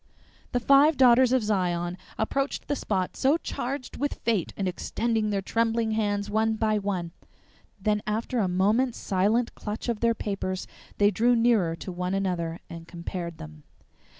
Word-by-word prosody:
The 245 - +1
five 280 +4 +5
Daughters 255 -1 +6
of 255 -3 +3
Zion 180 -4 0 0.2
approached 275 +5 -1
the 290 - 0
spot 190 -8 -2
so 275 +4 +3
charged 270 -4 -5
with 285 +1 -1
fate, 220 -7 -1
and 195 - -1
extended 220 +4 -1
their 200 -2 -1
trembling 225 +1 0
hands 205 -2 0
one 220 +1 +1
by 215 -1 +1
one. 185 -4 -3 0.7
Then 210 +1 +1
after 225 +3 -1
a 200 - +2
moment's 210 +8 +2
silent 210 +6 +1
clutch 210 +3 -5
of 235 -3 -1
their 230 -1 +2
papers 190 -3 -3 0.3
they 205 0 +4
drew 235 +5 +3
nearer 225 -8 +3
to 185 - -7
one 180 +1 -2
another 175 -3 -2
and 165 0 -9
compared 170 -1 -6
them. 75 - -10
210 Hz, 160 wpm, -27 LUFS, 185-235 Hz, 0.7 s, Daughters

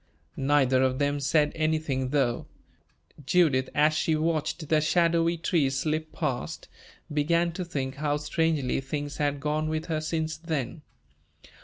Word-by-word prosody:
Neither 135 -2 +3
of 130 -1 +2
them 145 0 0
said 150 +1 +2
anything, 155 -5 0
though. 130 -4 0 0.8
Judith, 140 -4 +3
as 150 +1 +4
she 155 0 +1
watched 155 0 -1
the 155 0 +3
shadowy 170 +1 +2
trees 155 -6 +1
slip 155 +3 -1
past, 135 -7 -3 0.5
began 170 +3 +2
to 180 +2 -4
think 135 -5 -4
how 145 0 0
strangely 150 -3 0
things 145 +2 -4
had 145 -1 0
gone 155 +2 -1
with 155 0 -2
her 155 -2 -2
since 160 0 -2
then. 160 -3 -3
150 Hz, 140 wpm, -27 LUFS, 140-160 Hz, 0.8 s, as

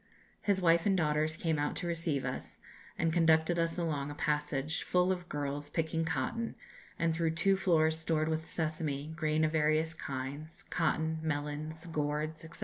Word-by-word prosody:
His 200 -2 +2
wife 165 +2 +4
and 195 -2 +3
daughters 155 -1 +1
came 160 -3 0
out 145 - 0
to 180 - -4
receive 165 -5 -1
us, 125 - -5 0.4
and 165 -1 +1
conducted 165 0 +4
us 165 0 +1
along 150 -5 -1
a 145 - -6
passage 150 0 0
full 180 +1 +2
of 180 -1 -3
girls 145 0 -3
picking 165 +1 0
cotton, 165 - -2 0.4
and 165 -1 +1
through 165 -1 0
two 195 +3 +4
floors 160 -4 +3
stored 160 -1 +1
with 160 0 -1
sesame, 155 -2 -2
grain 155 -1 +1
of 155 - +2
various 155 +1 +2
kinds, 140 +2 -5
cotton, 160 0 0
melons, 155 +1 -3
gourds, 155 -1 -2
&c. 160 - -8
160 Hz, 165 wpm, -32 LUFS, 150-165 Hz, 0.4 s, wife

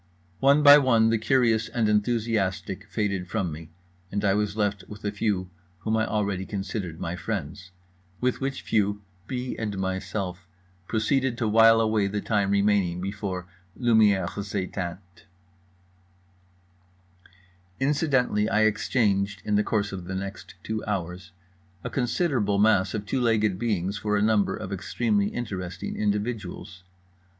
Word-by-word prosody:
One 140 +2 +4
by 145 0 +10
one 115 -5 +4
the 115 - +2
curious 115 -2 +2
and 115 -3 0
enthusiastic 105 -3 0
faded 100 -4 -1
from 90 -1 -2
me, 80 +1 -9 0.4
and 100 +1 -1
I 100 - +4
was 105 +1 -1
left 100 -3 0
with 105 0 -11
the 105 - -1
few 100 -3 -1 0.3
whom 110 +5 0
I 110 0 +1
already 100 -3 -1
considered 95 -4 -5
my 85 +1 -3
friends; 90 0 -5 0.5
with 125 +1 0
which 135 0 -3
few 105 -1 0 0.2
B. 125 -1 -3
and 105 -3 -3
myself 95 -1 -3 0.4
proceeded 120 +3 0
to 115 - 0
wile 115 +1 +6
away 110 -2 +2
the 105 +1 -2
time 100 -2 0
remaining 100 -3 +2
before 95 -1 -4 0.3
Lumières 110 -5 +4
Éteintes. 95 -3 -4 2.8
Incidentally, 135 -7 +1
I 110 - +2
exchanged 105 -2 +1
(in 105 - -1
the 105 +1 +3
course 105 -1 -1
of 95 -3 -6
the 95 +2 -5
next 100 -1 -6
two 110 0 -3
hours) 90 -2 -4 0.5
a - - -5
considerable 120 - 0
mass 100 -2 +3
of 105 -1 -4
two 130 +4 -1
legged 110 -5 +2
beings 100 -3 -1
for 105 -1 0
a - - +1
number 105 -2 +2
of 100 -3 -6
extremely 100 +1 0
interesting 95 -6 -5
individuals. 105 -3 -3
105 Hz, 140 wpm, -26 LUFS, 95-115 Hz, 2.8 s, by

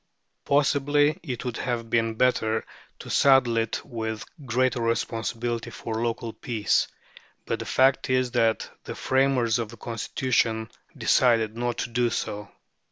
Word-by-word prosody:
Possibly 145 +2 +2
it 125 -2 -5
would 125 -2 -3
have 120 -2 -3
been 115 -1 +1
better 110 -2 +1 0.3
to - - -10
saddle 135 -4 +4
it 115 -1 -1
with 110 -3 -4 0.2
greater 125 +1 +1
responsibility 115 0 -2
for 115 0 -4
local 115 -1 -2
peace; 110 -4 0 0.6
but - - -2
the - - -5
fact 130 0 +3
is 130 -1 +2
that 115 -3 +1 0.2
the - - -6
framers 130 -3 +2
of 115 -2 -3
the 115 - -11
Constitution 115 0 -1 0.3
decided 115 -3 +3
not 120 0 -2
to - - -2
do 120 +1 +2
so. 105 -3 -4
120 Hz, 140 wpm, -26 LUFS, 115-130 Hz, 0.6 s, saddle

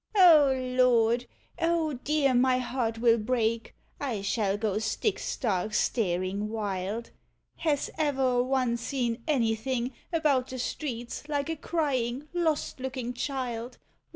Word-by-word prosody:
*' - - -28
"O 325 -8 +7
Lord! 250 -2 +2 0.3
O 330 -2 +1
dear, 275 +1 +1
my 255 +1 +4
heart 245 -2 -2
will 230 0 +4
break, 230 0 -1 0.2
I 235 -8 -3
shall 200 -1 0
go 210 -1 0
stick 220 - -1
stark 210 -3 -1
staring 195 -1 0
wild! 210 +1 -3 0.5
Has 300 -3 0
ever 265 -5 +2
a - - +5
one 255 -2 +1
seen 235 -1 -2
anything 245 -1 0 0.2
about 295 -6 +2
the 260 - -6
streets 245 +1 -4
like 290 +1 -1
a - - -2
crying 285 -4 -1
lost 320 -6 0
looking 255 -2 -4
child? 245 -2 -4
250 Hz, 130 wpm, -28 LUFS, 225-280 Hz, 0.5 s, O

